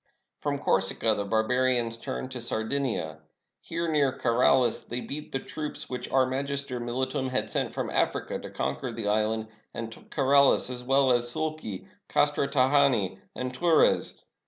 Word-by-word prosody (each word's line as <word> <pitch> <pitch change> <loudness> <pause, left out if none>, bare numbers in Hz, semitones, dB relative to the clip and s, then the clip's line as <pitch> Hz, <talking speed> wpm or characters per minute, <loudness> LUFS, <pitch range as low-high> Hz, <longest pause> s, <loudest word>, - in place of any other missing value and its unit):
From 145 -1 -1
Corsica 110 -2 +1
the 100 -1 -2
barbarians 115 +2 +1
turned 130 0 -5
to 125 - -5
Sar 110 -1 -2
553 135 +2 0
ROME 80 - -8
dinia. 80 - -20 0.4
Here, 170 +1 -3
near 145 -4 +2
KaraUs, 120 0 +3
they 120 - -3
beat 150 +4 -6
the - - 0
troops 150 +1 -6
which 125 - -5
out 130 -1 +4
magister 140 -1 -2
mihtum 130 +3 -2
had 130 - -1
sent - - 0
from - - -2
Africa - - 0
to - - -8
conquer - - -3
the 110 -3 -4
island, 110 +1 0 0.3
and 115 -1 -4
took - - -14
KaraUs 140 -2 +4
as 125 -1 -6
well 135 +1 +3
as 120 -1 +1
Sulci, 155 -10 -4 0.2
Castra 145 -1 +2
Tra 130 -2 +2
jani, 125 -10 +3 0.2
and 125 0 -3
Turres. 165 +4 +2
130 Hz, 170 wpm, -28 LUFS, 115-140 Hz, 0.4 s, out